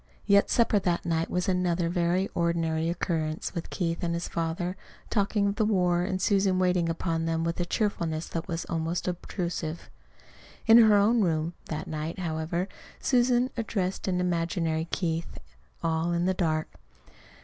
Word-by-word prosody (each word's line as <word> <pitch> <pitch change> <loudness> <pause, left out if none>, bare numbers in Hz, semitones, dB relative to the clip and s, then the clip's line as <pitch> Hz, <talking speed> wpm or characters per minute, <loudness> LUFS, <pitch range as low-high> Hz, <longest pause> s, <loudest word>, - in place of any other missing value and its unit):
Yet 200 0 +4
supper 225 -3 +3
that 175 -3 -1
night 165 -1 0
was 180 0 -1
another 180 -2 +1
very 175 +2 +1
ordinary 165 -1 0
occurrence, 160 -2 -2
with 170 - -5
Keith 170 -2 -2
and 170 -1 -1
his 170 - -3
father 170 +2 -2 0.4
talking 200 -1 +2
of 200 - -4
the 220 - +2
war 180 -4 +2
and 185 +1 -1
Susan 195 -1 +2
waiting 180 -2 +2
upon 165 0 -1
them 165 0 0
with 170 +1 -2
a 175 - 0
cheerfulness 170 -6 -1
that 165 0 -4
was 170 -2 -3
almost 165 +2 -2
obtrusive. 170 -2 -4 0.7
In 230 0 +8
her 220 -2 +7
own 215 +3 +4
room 165 -2 0
that 155 0 -4
night, 155 +2 -4
however, 170 +1 -2 0.3
Susan 250 0 +2
addressed 200 -6 -2
an 180 -1 +1
imaginary 165 -2 0
Keith, 165 -2 -2 0.5
all 165 +1 0
in 170 +1 +1
the 190 - +2
dark. 155 -4 -1
175 Hz, 160 wpm, -28 LUFS, 165-190 Hz, 0.7 s, In